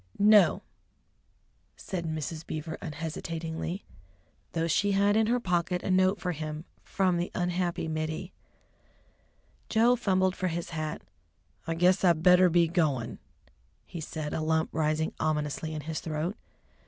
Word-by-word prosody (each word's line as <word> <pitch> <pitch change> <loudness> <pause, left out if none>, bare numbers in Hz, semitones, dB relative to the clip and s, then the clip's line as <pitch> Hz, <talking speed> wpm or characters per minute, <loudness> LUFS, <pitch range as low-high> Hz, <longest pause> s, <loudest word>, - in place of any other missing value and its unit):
"No," 205 -2 +5 1.1
said 175 -3 -5
Mrs. 155 0 -4
Beaver 155 +1 -4
unhesitatingly, 165 +3 -5 0.7
though 165 0 0
she 200 +5 +2
had 200 +1 +3
in 220 0 +3
her 245 +2 +2
pocket 180 -3 -1
a - - -1
note 185 +2 +3
for 180 - -2
him 155 0 -5 0.2
from 185 -2 +1
the 175 +1 -1
unhappy 175 -1 -1
Mittie. 160 +3 -3 1.4
Joe 235 +3 +4
fumbled 190 -5 +1
for 185 - -1
his 170 0 -4
hat. 155 -1 -4 0.6
"I 165 - -1
guess 180 +3 +3
I 175 -2 +6
better 180 +3 +5
be 170 0 +4
goin'," 150 -9 0 0.7
he 170 -3 -7
said, 155 -1 -5
a - - -1
lump 160 0 +1
rising 155 0 0
ominously 155 0 -1
in 155 -1 -4
his 155 +2 -4
throat. 160 +5 -3
170 Hz, 140 wpm, -29 LUFS, 155-185 Hz, 1.4 s, I